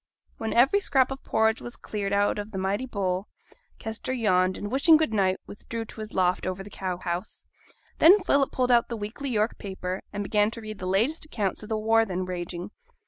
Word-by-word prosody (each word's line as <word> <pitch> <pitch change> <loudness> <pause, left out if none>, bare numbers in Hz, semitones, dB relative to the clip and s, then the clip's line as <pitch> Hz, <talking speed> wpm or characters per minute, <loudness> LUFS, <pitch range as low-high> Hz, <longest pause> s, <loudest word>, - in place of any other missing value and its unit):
When 225 - -2
every 270 +12 +5
scrap 270 -9 +2
of 270 - -6
porridge 220 +1 +1
was 240 - -7
cleared 200 -2 -4
out 205 +1 +2
of 205 +1 -5
the 195 - -6
mighty 195 +6 -1
bowl, 195 -4 -2 0.5
Kester 220 +3 -5
yawned, 185 -7 +2
and 205 - -5
wishing 310 +5 +6
good 310 -8 0
night, 190 -3 +2
withdrew 225 +2 -6
to 220 - -12
his 215 0 -6
loft 180 -1 +1
over 185 +1 -3
the 205 - -12
cow 185 -2 -3
house. 175 +3 -4 0.5
Then 375 +6 +8
Philip 280 -5 +2
pulled 250 -1 +1
out 240 -1 +4
the 235 - -3
weekly 220 +7 -5
York 220 -2 0
paper, 190 -1 -4
and 205 0 -3
began 210 0 +2
to 230 +1 -8
read 215 -1 -7
the 185 - -4
latest 230 - +1
accounts 210 -10 -2
of 215 - -10
the 220 - 0
war 225 +1 +3
then 185 -3 -3
raging. 175 -1 -5
210 Hz, 210 wpm, -26 LUFS, 190-235 Hz, 0.5 s, Then